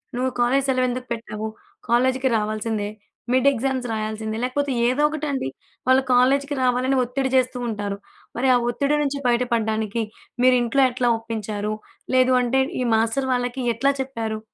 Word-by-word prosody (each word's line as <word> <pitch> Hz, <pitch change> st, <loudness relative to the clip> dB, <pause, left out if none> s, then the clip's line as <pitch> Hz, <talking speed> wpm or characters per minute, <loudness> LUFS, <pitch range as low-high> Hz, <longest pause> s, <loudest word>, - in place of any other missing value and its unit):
నువ్వు 255 Hz, +1 st, 0 dB
కాలేజీ 265 Hz, +3 st, +2 dB
సెలవెందుకు 255 Hz, -1 st, 0 dB
పెట్టావు, 220 Hz, -1 st, -5 dB, 0.4 s
కాలేజీకి 260 Hz, +2 st, +2 dB
రావాల్సిందే, 215 Hz, 0 st, -2 dB, 0.4 s
మిడ్ 260 Hz, +2 st, +3 dB
ఎగ్జామ్స్ 260 Hz, 0 st, -2 dB
రాయాల్సిందే, 220 Hz, 0 st, -3 dB
లేకపోతే 280 Hz, +2 st, -1 dB, 0.2 s
ఏదో 255 Hz, +4 st, +1 dB
ఒకటండి, 290 Hz, -, -2 dB, 0.4 s
వాళ్ళు 260 Hz, +1 st, +5 dB
కాలేజీకి 275 Hz, +3 st, +3 dB
రావాలని 255 Hz, +2 st, +2 dB
ఒత్తిడి 265 Hz, +2 st, -2 dB
జేస్తూ 250 Hz, -1 st, +2 dB
ఉంటారు, 205 Hz, -2 st, -3 dB, 0.4 s
మరి 260 Hz, +1 st, +2 dB
ఆ -, -, +5 dB
ఒత్తిడి 280 Hz, +4 st, +1 dB
నుంచి 280 Hz, 0 st, -2 dB
బయటపడ్డానికి, 230 Hz, -2 st, 0 dB, 0.4 s
మీరింట్లో 255 Hz, +1 st, +4 dB
ఎట్లా 245 Hz, -1 st, +1 dB
ఒప్పించారు? 215 Hz, -2 st, -4 dB, 0.4 s
లేదు 255 Hz, 0 st, +4 dB
అంటే, 260 Hz, +2 st, +2 dB, 0.2 s
ఈ -, -, +1 dB
మాస్టరు 230 Hz, +4 st, 0 dB
వాళ్ళకి 245 Hz, +1 st, -2 dB
ఎట్లా 275 Hz, +4 st, +2 dB
చెప్పారు? 225 Hz, -5 st, -4 dB
250 Hz, 135 wpm, -23 LUFS, 225-265 Hz, 0.4 s, వాళ్ళు